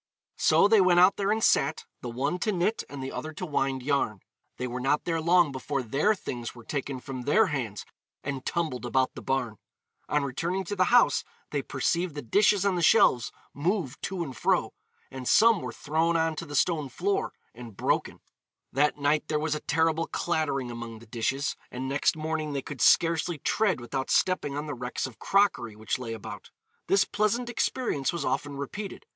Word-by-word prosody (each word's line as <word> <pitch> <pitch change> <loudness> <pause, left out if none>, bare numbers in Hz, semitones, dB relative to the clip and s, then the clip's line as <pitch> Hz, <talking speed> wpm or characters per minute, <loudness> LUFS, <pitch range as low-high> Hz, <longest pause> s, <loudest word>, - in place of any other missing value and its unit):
So - - +5
they 215 -1 +5
went 180 -1 +5
out 185 +2 +6
there 200 0 +1
and 220 +1 0
sat, 140 +3 +2 0.2
the 125 - -5
one 140 +9 -2
to 215 - 0
knit 190 +4 0
and 140 -1 -7
the 130 - -4
other 155 0 -5
to 180 - -5
wind 135 -4 -1
yarn. 130 -8 0 0.4
They 125 - -3
were 125 0 -4
not 135 +4 +1
there 165 -2 0
long 170 -1 +4
before 135 +1 -3
their 145 - +2
things 120 -11 -6
were 120 - -12
taken 140 0 -4
from 130 -1 -6
their 150 - +4
hands 115 -7 -3 0.4
and 135 -2 -4
tumbled 160 -8 -2
about 130 +1 +1
the - - -8
barn. 125 -5 -1 0.5
On 150 -1 +1
returning 170 +8 -2
to 195 +3 -4
the 185 -1 +3
house, 245 +5 +4 0.3
they - - 0
perceived 170 -2 -1
the 145 - -5
dishes 200 - +3
on 200 - +3
the 175 - -1
shelves 120 -6 +4 0.2
move 155 - -2
to 190 -3 -3
and 135 -5 -7
fro, - - +1 0.4
and 130 -1 -6
some 225 -2 +5
were 125 - -5
thrown 160 +6 0
on 160 -1 +1
to 170 - -5
the 145 - -6
stone 150 -2 +1
floor 195 +9 -1 0.2
and 115 -3 -11
broken. - - -1 0.5
That 150 +3 +2
night 150 +1 +1
there 155 - 0
was 155 0 -1
a 150 - -2
terrible 160 +2 +1
clattering 145 -7 -1
among 115 -1 -7
the 115 - -14
dishes, 130 +6 -1
and 130 +2 -5
next 140 +3 +1
morning 155 -1 -3
they 140 -2 -2
could 145 - -7
scarcely 165 0 +4
tread 200 +4 +1
without 130 +2 -4
stepping 165 -6 +1
on 150 - -3
the 150 - -4
wrecks 125 -1 -3
of 130 -4 -9
crockery 190 - +2
which 110 +3 -3
lay 115 -3 -5
about. 110 - -8 0.4
This 195 0 +4
pleasant 235 +4 0
experience 230 - -1
was 170 -4 -3
often 145 -1 -2
repeated. 195 +8 -6
150 Hz, 195 wpm, -27 LUFS, 130-175 Hz, 0.5 s, out